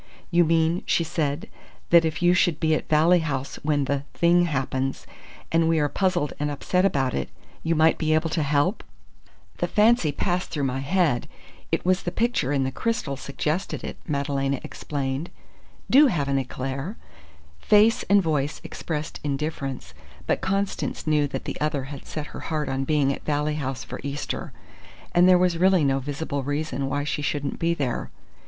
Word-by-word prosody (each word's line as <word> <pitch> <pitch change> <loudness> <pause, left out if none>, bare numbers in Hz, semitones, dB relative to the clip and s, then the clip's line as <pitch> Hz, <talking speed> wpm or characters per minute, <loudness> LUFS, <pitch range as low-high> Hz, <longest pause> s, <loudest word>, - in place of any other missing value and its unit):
"You 175 0 +5
mean," 165 +2 +2
she 170 - +2
said, 155 -2 -2 0.4
"that 170 -1 +7
if 160 +2 -2
you 175 0 +6
should 175 -4 +2
be 160 -1 +2
at 155 - -2
Valley 160 +4 +5
House 140 -4 -3
when 145 -2 +1
the 140 0 -1
thing 175 +1 +4
happens, 135 -3 -2 0.5
and 165 0 +3
we 165 - +3
are 145 -1 +2
puzzled 180 -5 0
and 150 0 0
upset 180 +6 0
about 135 -9 +1
it, 70 - -2 0.3
you 165 +1 0
might 160 +1 +4
be 155 -1 +2
able 160 0 0
to 160 - 0
help?" 145 +7 +1 0.7
"The - - 0
fancy 215 -7 +3
passed 180 +4 -1
through 145 - -2
my 135 0 -1
head. 150 -3 +1 0.4
It - - 0
was 185 +1 +3
the 175 - -3
picture 225 - 0
in 140 -2 +1
the 130 - -1
crystal 155 - -2
suggested 150 +7 -3
it," - - -5
Madalena 140 -2 -1
explained. 140 +2 -4 0.6
"Do 285 +3 +7
have 155 - 0
an 135 -1 +1
éclair!" 135 - -5 0.6
Face 215 - +4
and 200 -1 +5
voice 150 -2 -1
expressed 155 -2 -5
indifference; 140 - -3 0.3
but - - 0
Constance 195 +1 -2
knew 150 -2 +2
that 140 - -5
the - - -5
other 150 -3 0
had 140 - -10
set 155 -1 -5
her - - -6
heart 155 -3 -1
on 135 0 -1
being 140 -2 +2
at - - -9
Valley 150 0 0
House 130 -1 -3
for - - -7
Easter; 140 +1 -4 0.6
and 180 +1 +5
there 180 - +7
was 180 -2 +1
really 185 -2 +4
no 135 -1 +2
visible 145 +1 -3
reason 145 0 -2
why 145 +1 -1
she 150 0 -2
shouldn't 145 0 -2
be 170 0 +1
there. 135 -6 -2
150 Hz, 180 wpm, -25 LUFS, 140-175 Hz, 0.7 s, that